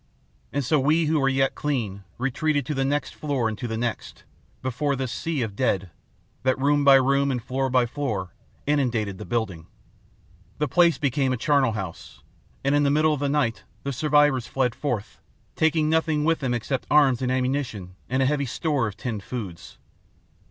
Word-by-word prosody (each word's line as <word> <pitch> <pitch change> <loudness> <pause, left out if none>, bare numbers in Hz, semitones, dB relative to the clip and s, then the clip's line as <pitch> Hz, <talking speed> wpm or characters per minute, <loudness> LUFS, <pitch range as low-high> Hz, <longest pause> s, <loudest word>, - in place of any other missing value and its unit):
And 145 -2 -1
so 150 +3 +3
we 155 +5 +3
who 155 0 +2
were 135 -1 +3
yet 135 0 +1
clean 115 -10 -2
retreated 140 +3 0
to 150 - -2
the 135 -1 0
next 145 +2 -1
floor 140 -6 -1
and 110 - -2
to 120 - -3
the 110 -1 -3
next, 120 0 -4 0.4
before 135 +3 0
this 130 -2 -3
sea 155 -1 -2
of 110 - -3
the - - -18
dead, 95 -8 0 0.5
that, 130 +1 +1
room 145 +2 +2
by 140 -1 +8
room 140 +1 +3
and 130 -2 0
floor 130 +2 -2
by 125 -1 +3
floor, 115 -9 -3 0.3
inundated 120 -9 0
the - - -6
building. 100 -9 -2 0.9
"The 150 - 0
place 170 +3 +4
became 140 -1 +1
a - - -1
charnel 135 -1 +2
house, 95 -5 -7 0.4
and 140 +1 +2
in 145 - +4
the 145 - +3
middle 155 +2 +3
of 145 - -3
the 140 0 0
night 140 -6 0 0.2
the 140 - -2
survivors 145 -2 +3
fled 125 -3 0
forth, 120 -8 -4 0.3
taking 160 -1 +2
nothing 160 -1 +1
with 165 +1 +2
them 130 -4 -1
except 125 +3 -3
arms 140 -5 +4
and 125 -1 0
ammunition 125 -8 -2 0.2
and 130 +1 +1
a - - +2
heavy 140 0 0
store 145 -2 0
of 105 -1 -7
tinned 110 -3 -4
foods. 95 -7 -7
135 Hz, 190 wpm, -25 LUFS, 120-145 Hz, 0.9 s, by